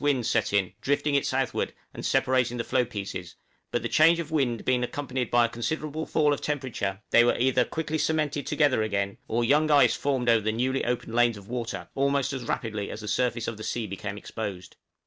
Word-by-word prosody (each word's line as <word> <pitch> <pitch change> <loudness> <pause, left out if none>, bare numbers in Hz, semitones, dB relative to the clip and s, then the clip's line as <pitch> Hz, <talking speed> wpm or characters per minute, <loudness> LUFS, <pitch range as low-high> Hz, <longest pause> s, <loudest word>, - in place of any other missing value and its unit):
winds 135 -5 +1
set 110 -4 +1
in, 100 -3 +1
drifting 145 +1 0
it 140 - +2
southward, 130 0 -1 0.2
and - - -8
separating 125 -2 +1
the 115 - -1
floe 130 +1 +1
pieces; 100 -6 -6 0.3
but - - -2
the - - 0
change 165 +2 +5
of 160 -2 -5
wind 130 -7 0
being 125 -1 +2
accompanied 130 -1 -3
by 120 -1 +4
a - - -2
considerable 155 +7 -3
fall 150 -1 +3
of 145 - -4
temperature, 125 -9 -2
they 120 - +7
were 120 - +2
either 130 0 +3
quickly 155 +4 -3
cemented 150 -2 0
together 145 -7 +2
again, 100 -2 -1
or 120 +2 0
young 150 +5 +3
ice 145 -2 +6
formed 135 -4 -1
over 115 -2 +5
the 110 +1 0
newly 130 +4 0
opened 120 -2 -2
lanes 120 -2 +3
of 100 -1 -13
water, 115 -7 -4
almost 140 0 +1
as 130 -3 -5
rapidly 110 -3 -3
as 110 - -6
the 105 - -7
surface 120 0 0
of 115 - -4
the 110 - -8
sea 115 +1 -2
became 100 +1 -5
exposed. 100 -3 -6
125 Hz, 210 wpm, -27 LUFS, 110-140 Hz, 0.3 s, they